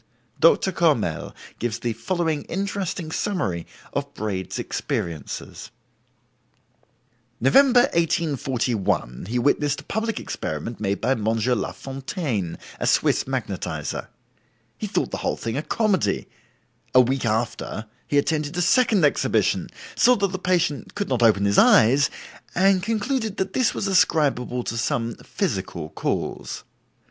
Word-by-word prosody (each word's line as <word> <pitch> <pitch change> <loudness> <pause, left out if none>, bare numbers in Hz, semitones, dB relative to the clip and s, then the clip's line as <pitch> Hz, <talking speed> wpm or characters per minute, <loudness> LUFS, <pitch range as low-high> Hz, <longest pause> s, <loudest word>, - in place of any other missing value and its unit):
Doctor - - +5
Courmelles - - +1 0.3
gives 115 -1 -1
the 120 0 -2
following 160 - -1
interesting 190 -3 -3
summary 110 - -2 0.3
of - - -2
Braid's 95 -4 -3
experiences: 80 -5 -4 1.7
"November, 245 - +6
1841, 130 - 0
he 120 - 0
witnessed 145 +3 +1
a - - -18
public 225 +1 -2
experiment 80 +10 -5
made 100 -1 -1
by 135 - +2
Monsieur 115 +1 +1
Lafontaine, 125 - -3 0.2
a - - -1
Swiss - - +3
magnetizer. - - -3 0.7
He - - -4
thought - - -1
the - - -2
whole - - -2
thing 115 0 -4
a 145 - 0
comedy; 210 +2 0 0.7
a 130 - +9
week 130 +2 0
after, 110 0 -2 0.2
he 145 - +1
attended 155 +2 0
a - - +2
second 215 - +4
exhibition, 145 - +1 0.3
saw 250 - +5
that 200 -4 0
the 190 - -4
patient 175 -5 0
could 205 -1 -2
not 125 -2 0
open 105 -4 +4
his 100 0 +4
eyes, 135 +6 +6 0.5
and 190 +1 +4
concluded 220 +1 -1
that 190 0 -2
this 255 -3 +2
was - - -2
ascribable 145 -10 +2
to 115 - -4
some 115 0 -1
physical 85 -4 -3
cause. - - -3
140 Hz, 130 wpm, -24 LUFS, 115-185 Hz, 1.7 s, a